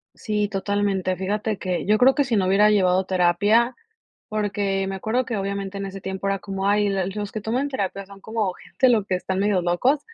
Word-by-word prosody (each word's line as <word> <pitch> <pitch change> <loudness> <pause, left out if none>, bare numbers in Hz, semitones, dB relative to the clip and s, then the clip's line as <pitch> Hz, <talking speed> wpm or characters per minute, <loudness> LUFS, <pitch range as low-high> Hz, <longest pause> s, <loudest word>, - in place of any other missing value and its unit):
Sí, 210 -2 -1
totalmente. 195 -2 -1
Fíjate 205 +3 -2
que 180 -4 -3
yo 210 +2 +3
creo 260 +4 +5
que 285 - +3
si 250 -4 -1
no 190 -3 +2
hubiera 205 +3 +5
llevado 185 -2 +3
terapia 205 +7 +2 0.5
porque 200 -2 -1
me 195 - -3
acuerdo 220 +6 -1
que 235 - -3
obviamente 200 0 -3
en 195 - -4
ese 195 0 -7
tiempo 190 +1 -5
era 195 0 0
como: 195 0 -3
"Ay, 205 0 +3
l 195 -2 0
los 205 +1 -5
que 215 - -4
toman 245 +7 -1
terapia 195 -7 -3
son 200 0 -14
como 220 -3 -2
gente 260 - 0
los 225 -5 +3
que 185 - 0
están 190 +1 -3
medio 200 -2 +2
locos", 245 - +2
200 Hz, 215 wpm, -23 LUFS, 190-215 Hz, 0.5 s, creo